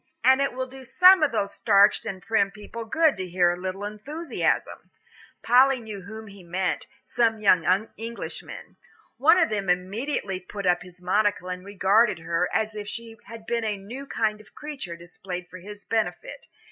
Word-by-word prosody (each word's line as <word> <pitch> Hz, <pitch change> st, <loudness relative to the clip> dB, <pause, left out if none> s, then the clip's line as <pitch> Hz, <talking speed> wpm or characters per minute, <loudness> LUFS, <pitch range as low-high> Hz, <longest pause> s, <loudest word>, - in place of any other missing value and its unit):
And 265 Hz, +1 st, +5 dB
it 275 Hz, -, 0 dB
will 260 Hz, +1 st, -3 dB
do 265 Hz, +1 st, -12 dB
some 365 Hz, +8 st, +6 dB
of 305 Hz, -, +3 dB
those 200 Hz, -3 st, -1 dB
starched 205 Hz, 0 st, +4 dB
and 190 Hz, -3 st, -6 dB
prim 205 Hz, -3 st, +2 dB
people 210 Hz, +3 st, -9 dB
good 315 Hz, +5 st, +3 dB
to 185 Hz, -1 st, -4 dB
hear 175 Hz, 0 st, +3 dB
a -, -, -2 dB
little 185 Hz, +2 st, -5 dB
enthusiasm." 275 Hz, +11 st, -3 dB, 0.5 s
Polly 260 Hz, +2 st, +5 dB
knew 215 Hz, -4 st, -8 dB
whom 220 Hz, +4 st, -9 dB
he 200 Hz, -2 st, -13 dB
meant, 180 Hz, +2 st, -2 dB, 0.2 s
some 230 Hz, -2 st, +1 dB
young 190 Hz, +1 st, +3 dB
Englishmen. 230 Hz, +1 st, -7 dB, 0.4 s
One 300 Hz, +8 st, +5 dB
of 330 Hz, -3 st, +3 dB
them 200 Hz, -3 st, -2 dB
immediately 195 Hz, +2 st, -1 dB
put 200 Hz, +2 st, -7 dB
up 175 Hz, -1 st, +3 dB
his 180 Hz, 0 st, -14 dB
monocle 190 Hz, 0 st, +1 dB
and 180 Hz, 0 st, -5 dB
regarded 200 Hz, +2 st, +2 dB
her 165 Hz, +2 st, -1 dB
as 220 Hz, 0 st, 0 dB
if 210 Hz, -1 st, -7 dB
she 230 Hz, +1 st, -6 dB
had 225 Hz, +1 st, -11 dB
been 235 Hz, 0 st, -1 dB
a 210 Hz, -2 st, -1 dB
new 240 Hz, +8 st, -9 dB
kind 215 Hz, -4 st, -1 dB
of -, -, -22 dB
creature 275 Hz, -, -6 dB
displayed 175 Hz, +1 st, -8 dB
for 185 Hz, -, -11 dB
his 205 Hz, +3 st, -11 dB
benefit. 230 Hz, -, -3 dB
210 Hz, 180 wpm, -25 LUFS, 185-235 Hz, 0.5 s, some